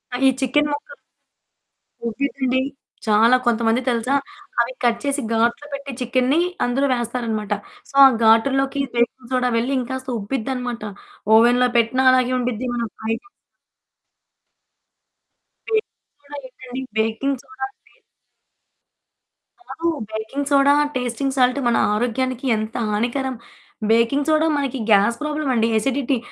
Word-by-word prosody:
ఆహ్, 255 - -2
ఈ - - +7
చికెన్ 295 +3 +2
ముక్కలు 290 +12 -5 1.1
ఓకేనండి 260 +1 -1 0.5
చాలా 225 +4 +5
కొంతమంది 235 +1 +2
తెలుసా! 240 +2 0 0.5
అవి - - +1
కట్ 235 -1 +2
చేసి 285 0 -1
గాట్లు 235 +5 +1
పెట్టి 280 0 -5
చికెనుని 255 +4 +1 0.3
అందులో 265 +3 +1
వేస్తారన్నమాట. 230 -3 -2 0.4
సో, - - -15
ఆ - - +11 0.2
గాటుల్లోకి 270 +5 +3
బేకింగ్ 240 +1 -1
సోడా 250 -1 +2
వెళ్లి 240 +4 0
ఇంకాస్త 260 +1 -5
ఉబ్బిద్దన్నమాట 245 +2 -3 0.5
ఓవెన్‌లో 245 +2 +5
పెట్టినా 245 +3 +2
అలాగే 255 0 +2
ఉండుద్ది. 250 0 -2
మనం 235 -1 -2
ఫ్రై 220 +1 -1
చేసి 400 - -22 2.4
బేకింగ్ 435 -9 -4
సోడా 290 0 -9
ఏంటండీ? 255 0 -8 0.2
బేకింగ్ 225 +5 0
సోడాంటే 265 +1 -9 1.8
కాదు. 335 - -3 0.2
బేకింగ్ 220 +6 -4
సోడా, 280 0 +5 0.2
టేస్టింగ్ 255 +2 -2
సాల్ట్ 255 +1 +3
మన 235 - +3 0.2
ఆరోగ్యానికి 250 +3 -1
ఎంత 215 +1 -5
హానికరం. 245 +5 -1 0.6
బేకింగ్ 235 +6 +2
సోడా 310 +1 +3
మనకి 275 -2 -2
గ్యాస్ 205 +3 +4
ప్రాబ్లమండి. 295 -7 0
ఎసిడిటీ. 270 +3 0
255 Hz, 115 wpm, -21 LUFS, 230-275 Hz, 2.4 s, ఆ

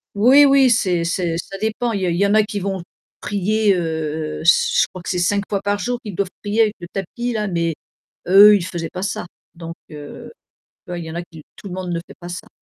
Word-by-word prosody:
Oui, 255 +8 +6
oui, 275 -2 +5
c'est 180 -7 +1
c'est 170 -1 -1
ça 195 +3 -6
dépend. 220 +3 -1
Il 200 -3 -2
y 185 - 0
en - - +1
il 170 - 0
y 200 - +3
en 200 - +2
a 215 - +6
qui 205 -1 -4
vont 195 -1 -3 0.4
prier, 205 0 +1
heu 160 -2 -3
heu, - - -8
je 170 - +4
crois 185 -3 -11
que - - -6
c'est 180 - -1
5 200 +3 +1
fois 200 -2 -2
par 205 0 0
jour 245 +3 -3
qu'ils 205 -5 -7
doivent 200 -1 -1
prier 210 +2 +1
avec 210 -2 0
le 175 - -8
tapis, 235 +6 -4
là 210 -1 -1
mais 170 -3 -1 0.5
eux, 205 +3 +8
ils 185 -4 -1
faisaient 170 -3 -5
pas 185 +1 -5
ça. 185 -2 -3 0.3
Donc 165 -1 -8 0.2
heu, 150 -1 -10 0.6
tu - - -12
vois? 175 - -4
Il 170 - -6
y 160 - -7
en - - -8
a 170 - -3
qui 160 -3 -13
tout 200 - -10
le 180 - -6
monde 185 -1 -5
ne 170 - -1
fait - - -13
pas 175 - -9
ça. 175 - -7
190 Hz, 260 wpm, -20 LUFS, 170-210 Hz, 0.6 s, eux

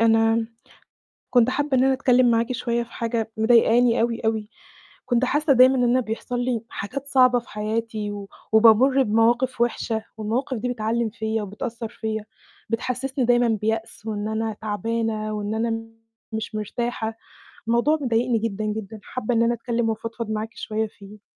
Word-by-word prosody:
أنا 225 0 +3 0.8
كنت 245 -1 +4
حابة 285 0 0
إن 255 - +4
أنا 270 - +4
أتكلِّم 255 -2 +4
معاكِ 230 +2 +1
شويّة 235 -1 -1
في 235 - -12
حاجة 230 -1 -2
مضايقاني 235 +1 +4
أوي، 230 0 0
أوي. 220 -1 0 0.6
كنت 245 0 +2
حاسّة 295 +2 +2
دايمًا 255 +1 +6
إن 250 - +2
أنا 245 +1 +3
بيحصل 240 +1 -3
لي 245 -2 -1
حاجات 270 +7 -5
صعبة 255 -3 +5
في 240 - -17
حياتي، 215 0 -3
و 200 -1 -7 0.2
وبامُر 235 +5 +6
بمواقف 235 +3 +2
وِحشة، 225 -2 0
والمواقف 235 +4 -2
دي 245 +3 -2
بتعلِّم 225 0 -1
فيّا 220 0 -2
وبتأثّر 225 +3 -5
فيّا، 220 -1 -4 0.4
بتحسّسني 255 +3 -1
دايمًا 240 0 +4
بيأس، 220 0 -2
وإن 210 -1 -3
أنا 220 0 -2
تعبانة، 220 0 -2
وإن 210 +1 -3
أنا 225 0 -1 0.5
مش 220 0 -4
مرتاحة. 225 +1 -3 0.6
الموضوع 240 +7 +3
مضايقني 240 -2 +1
جدًا، 215 -1 -3
جدًا، 215 0 -4
حابّة 245 +1 -3
إن 230 - +3
أنا 235 +1 +2
أتكلِّم 235 0 -1
وأفضفض 225 0 -4
معاكِ 220 +1 -2
شويّة 220 +1 -2
فيه. 210 0 -14
230 Hz, 155 wpm, -23 LUFS, 220-245 Hz, 0.8 s, دايمًا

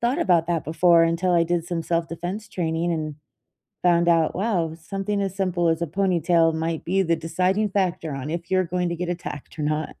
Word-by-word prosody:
thought 240 +3 +1
about 170 -3 +3
that 170 -3 -1
before, 165 +2 +4
until 165 +2 +1
I 170 - +4
did 170 0 0
some 175 -2 -2
self-defense 175 +5 -3
training 170 -3 -1
and 155 -2 -3 0.7
found 170 -1 +3
out, 165 -2 +3
wow, 180 -6 0
something 195 +4 -3
as 195 -1 -2
simple 180 -3 +1
as 165 +1 0
a 170 - 0
ponytail 170 -2 +2
might 160 0 -2
be 190 +3 +1
the 170 -2 +2
deciding 185 +6 0
factor 180 -5 -1
on 135 +2 -5
if 170 +2 -5
you're 185 -1 +3
going 180 +1 -1
to 170 - -2
get 180 +1 -4
attacked 170 -5 -6
or - - -3
not. 150 +1 -1
170 Hz, 205 wpm, -24 LUFS, 165-185 Hz, 0.7 s, before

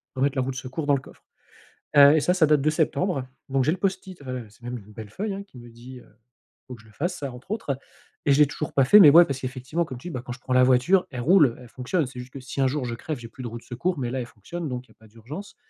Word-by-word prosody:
remettre 140 +2 +1
la - - +3
roue 135 - -3
de 130 - -8
secours 130 +4 -5
dans 145 - +3
le 135 - -3
coffre. - - -17 0.7
Heu, 140 +1 +9
et - - +4
ça, 180 - +2
ça 180 -3 +4
date 150 -2 +3
de 155 - +2
septembre 155 -2 0 0.2
donc 135 -1 +1
j'ai 155 - +3
le 180 - -2
post-it, 190 -3 -3
heu 130 -3 -5
c'est 105 - -23
même 120 +1 -5
une 105 -1 -14
belle 110 -1 -9
feuille 200 - -4
hein 200 +1 -6
qui 195 -10 -18
me 120 0 -12
dit, 125 +2 -12
heu: - - -19 0.6
«Faut 125 - -6
que 115 - -17
je 110 - -21
le 110 - -20
fasse, 175 - -3
ça» 140 -3 -5
entre 125 +9 -12
autres 145 - -2 0.5
et 140 - +5
je 140 - +2
l'ai 150 - +7
toujours 150 +1 -5
pas 135 -2 +4
fait 210 +9 +8
mais 160 - +10
ouais, 170 +4 +8
parce 135 -3 -4
qu'effectivement 130 +6 -3
comme 130 - -8
tu 150 +9 -8
dis: - - -7
«Bah, 125 - -4
quand 125 - -5
je 125 - -12
prends 130 - -4
la 125 0 +6
voiture, 130 +10 +3
elle 125 -5 -5
roule, 150 -4 +4
elle 125 -2 -13
fonctionne». 135 +7 -1
C'est 125 0 -9
juste 125 +1 -10
que 135 - -7
si 135 +1 -4
un 135 - +4
jour 135 -1 -2
je 120 - -3
crève, 155 +3 -5
j'ai 115 - -9
plus 130 - -11
de - - -4
roue 115 0 -6
de 115 - -13
secours, 170 +9 -2
mais 125 -3 -3
là, 130 - -2
elle 125 - -3
fonctionne 155 - -7
donc 125 0 -5
il - - -23
y - - -20
a - - -41
pas 110 - -18
d'urgence 125 - -10
135 Hz, 325 wpm, -25 LUFS, 125-155 Hz, 0.7 s, mais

